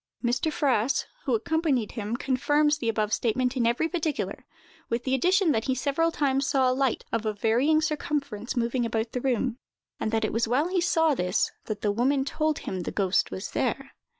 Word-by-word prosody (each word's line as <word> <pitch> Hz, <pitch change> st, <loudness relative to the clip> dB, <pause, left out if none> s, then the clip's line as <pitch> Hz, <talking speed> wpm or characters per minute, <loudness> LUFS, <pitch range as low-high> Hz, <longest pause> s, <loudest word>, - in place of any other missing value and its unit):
Mr. 250 Hz, +6 st, +1 dB
Fraas, 265 Hz, -4 st, +1 dB, 0.2 s
who -, -, +2 dB
accompanied 320 Hz, -, 0 dB
him, 220 Hz, +1 st, -3 dB
confirms 290 Hz, +3 st, +2 dB
the 230 Hz, -, -1 dB
above 215 Hz, -1 st, 0 dB
statement 250 Hz, +3 st, 0 dB
in 240 Hz, -3 st, +2 dB
every 240 Hz, +7 st, +1 dB
particular, 285 Hz, -, -3 dB, 0.4 s
with 235 Hz, +1 st, -1 dB
the 260 Hz, -, -1 dB
addition 360 Hz, +6 st, +3 dB
that 225 Hz, -4 st, 0 dB
he 260 Hz, -, +1 dB
several 290 Hz, +6 st, +1 dB
times 275 Hz, -3 st, +1 dB
saw 260 Hz, -3 st, +3 dB
a -, -, +2 dB
light, 265 Hz, -2 st, 0 dB
of 230 Hz, -1 st, -1 dB
a 215 Hz, -1 st, -1 dB
varying 245 Hz, +9 st, +2 dB
circumference, 280 Hz, -7 st, -2 dB
moving 240 Hz, +1 st, 0 dB
about 225 Hz, 0 st, -1 dB
the 250 Hz, -, -3 dB
room; 250 Hz, -1 st, 0 dB, 0.4 s
and -, -, -1 dB
that 225 Hz, -1 st, +1 dB
it -, -, -3 dB
was 230 Hz, +1 st, +1 dB
while 275 Hz, +9 st, +1 dB
he 365 Hz, -1 st, +1 dB
saw 325 Hz, -3 st, +3 dB
this, 180 Hz, -7 st, 0 dB
that 210 Hz, -2 st, -4 dB
the 205 Hz, -, +1 dB
woman 265 Hz, +5 st, +1 dB
told 310 Hz, +1 st, 0 dB
him 190 Hz, -, -4 dB
the 175 Hz, -, -3 dB
ghost 195 Hz, -2 st, +1 dB
was 190 Hz, -, -6 dB
there. 270 Hz, +2 st, -2 dB
255 Hz, 200 wpm, -27 LUFS, 225-295 Hz, 0.4 s, addition